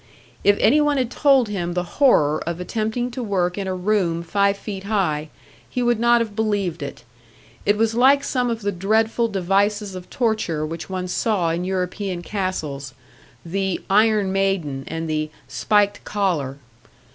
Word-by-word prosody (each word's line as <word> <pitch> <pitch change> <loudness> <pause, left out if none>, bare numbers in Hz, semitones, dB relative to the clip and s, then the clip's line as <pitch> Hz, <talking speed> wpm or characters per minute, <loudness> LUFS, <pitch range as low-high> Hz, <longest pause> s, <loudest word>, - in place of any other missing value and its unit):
If 205 0 +5
any 280 +8 +5
one 295 -1 +2
had 250 -2 0
told 270 -4 +4
him 175 -4 -3
the 180 - 0 0.2
horror 155 - +4
of 170 0 -3
attempting 220 +6 -2
to 250 - -5
work 185 -5 0
in 195 -2 -4
a 185 - -2
room 180 -3 0
five 200 +3 +1
feet 195 -2 -7
high, 165 -8 0 0.4
he 250 - -1
would 240 -2 +2
not 235 0 +4
have 220 -3 -4
believed 205 -6 -1
it. 140 -4 -7 0.6
It 205 +1 +4
was 225 0 +2
like 270 +4 +5
some 250 -3 0
of 230 -2 -3
the 205 - 0
dreadful 220 +5 +1
devices 200 +1 0
of 185 -1 -9
torture 215 -10 0
which 165 +3 -6
one 185 -1 -3
saw 180 -3 0
in 170 +2 -2
European 185 0 -3
castles, 155 -10 -4 0.5
the 190 +1 -1
"iron 210 -1 +4
maiden" 190 -9 -1
and 165 0 -4
the 155 -1 -1 0.2
"spiked 205 -1 +1
collar." 170 -10 -1
195 Hz, 165 wpm, -22 LUFS, 175-220 Hz, 0.6 s, If